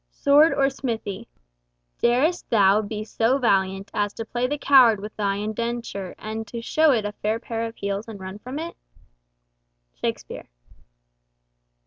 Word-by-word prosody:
SWORD 290 +3 +4
OR 275 -1 +3
SMITHY 230 -5 -4 0.7
"Darest 270 +9 +2
thou 205 -2 +4
be 215 0 -5
so 225 +4 +1
valiant 195 -5 +1
as 205 0 -1
to 225 - -6
play 240 +3 -1
the 295 +3 -2
coward 255 -7 +6
with 210 +2 -8
thy 200 -2 0
indenture, 215 -2 -4
and 220 +1 -6
to 235 - -6
show 310 +7 +2
it 225 -5 +1
a 205 - -2
fair 215 +1 -2
pair 230 0 -3
of 225 - -10
heels 200 +2 -3
and 220 -3 -8
run 190 +2 -8
from 255 +6 -7
it?" 335 +2 -5 1.2
Shakespeare. - - -5
225 Hz, 150 wpm, -24 LUFS, 205-250 Hz, 1.2 s, coward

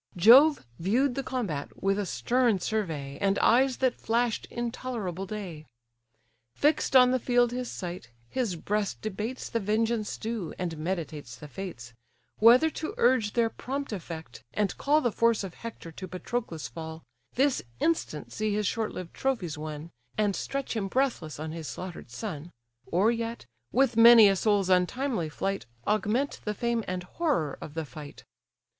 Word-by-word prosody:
Jove 260 - +7
view'd 245 +10 +2
the 275 - -2
combat 210 - -3
with 195 +1 +2
a 200 - -2
stern 225 - +2
survey, 160 -10 -3
And 200 0 +2
eyes 260 +2 +4
that 250 - 0
flash'd 230 0 0
intolerable 230 -6 -4
day. 180 -7 -6 0.9
Fix'd 295 -2 +2
on 250 -1 +8
the 255 - +2
field 245 0 +3
his 250 0 -3
sight, 175 -6 -6 0.2
his 235 - -1
breast 205 +5 -2
debates 215 +4 -4
The 230 - -1
vengeance 220 +1 0
due, 220 -7 -4
and 175 -3 -3
meditates 155 -7 -4
the 150 - -10
fates: 140 -9 -7 0.5
Whether 245 +8 +7
to 310 - -5
urge 235 -4 +3
their 230 -1 +2
prompt 275 0 -4
effect, 165 -4 -7
and 205 -3 0
call 300 +2 +3
The 240 - +1
force 230 -1 +2
of 190 -3 -6
Hector 230 -7 -8
to 185 +4 -8
Patroclus' 185 -1 -4
fall, 160 -1 -8 0.3
This 270 +1 +2 0.2
instant 320 - -1
see 215 -1 -1
his 210 0 0
short 220 +2 -1
lived 180 -2 -7
trophies 215 - -1
won, 155 +1 -7 0.3
And 205 -2 +2
stretch 275 -3 -3
him 205 -3 -1
breathless 235 - -1
on 155 0 -4
his 160 -2 -6
slaughter'd 180 -7 -7
son; 160 - -6 0.4
Or 195 +7 +3
yet, 230 0 -4 0.3
with 250 -2 +2
many 230 -2 +10
a 195 - +3
soul's 205 -1 +2
untimely 185 - +1
flight, 195 +3 -3 0.2
Augment 215 +6 0
the 210 -1 -2
fame 235 +1 0
and 180 0 -3
horror 245 - -1
of 150 - -8
the 160 -1 -2
fight. 150 0 -10
210 Hz, 160 wpm, -28 LUFS, 175-240 Hz, 0.9 s, many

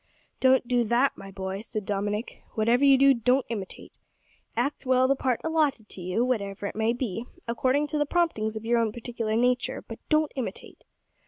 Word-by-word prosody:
"Don't 260 -1 +4
do 245 -1 +2
that, 240 +5 +2
my 195 - -10
boy," 190 0 -5
said 215 -2 -5
Dominick; 205 +2 -3
"whatever 235 +4 +3
you 275 -1 +7
do, 275 +1 +6
don't 250 +2 +2
imitate. 205 -5 -6 0.7
Act 285 0 -1
well 260 -1 +3
the 275 - +3
part 255 -3 0
allotted 300 -9 0
to 185 - -7
you, 185 +7 0
whatever 200 -5 -2
it - - -4
may 220 +1 +1
be, 235 -2 -3 0.2
according 260 +5 +1
to 300 +1 -2
the 295 - +1
promptings 285 -11 0
of 220 0 -6
your 235 +1 +3
own 225 -2 +1
particular 230 -1 -3
nature; 250 +2 +1
but - - -8
don't 310 -1 +2
imitate." 260 -3 -6
240 Hz, 185 wpm, -27 LUFS, 215-265 Hz, 0.7 s, you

